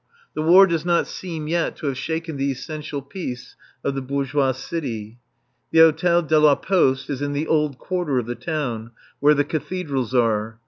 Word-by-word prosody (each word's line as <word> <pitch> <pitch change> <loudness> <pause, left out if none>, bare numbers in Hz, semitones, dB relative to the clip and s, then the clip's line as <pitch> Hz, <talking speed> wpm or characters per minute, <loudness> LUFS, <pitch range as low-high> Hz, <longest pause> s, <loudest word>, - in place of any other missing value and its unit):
The - - -3
War 180 +5 +7
does 170 -4 -1
not 175 -1 +2
seem 165 -5 -6
yet 170 +1 0
to - - -9
have 140 -2 -1
shaken 160 +4 -4
the 140 0 -1
essential 145 +1 -6
peace 130 -11 -7 0.3
of 140 - 0
the 135 - -3
bourgeois 140 0 0
city. 120 -5 -5 0.5
The 165 - -1
Hôtel 165 +1 +5
de 155 0 +4
la 150 -2 +6
Poste 135 -9 +1
is 140 -1 -4
in 145 0 -2
the 145 +2 -1
old 150 -4 +1
quarter 175 -6 -2
of 125 - 0
the 120 - -3
town, 120 -7 -4 0.3
where 150 +1 +5
the 145 0 +1
Cathedrals 145 -5 -3
are. 115 -2 +1
145 Hz, 185 wpm, -22 LUFS, 130-165 Hz, 0.5 s, War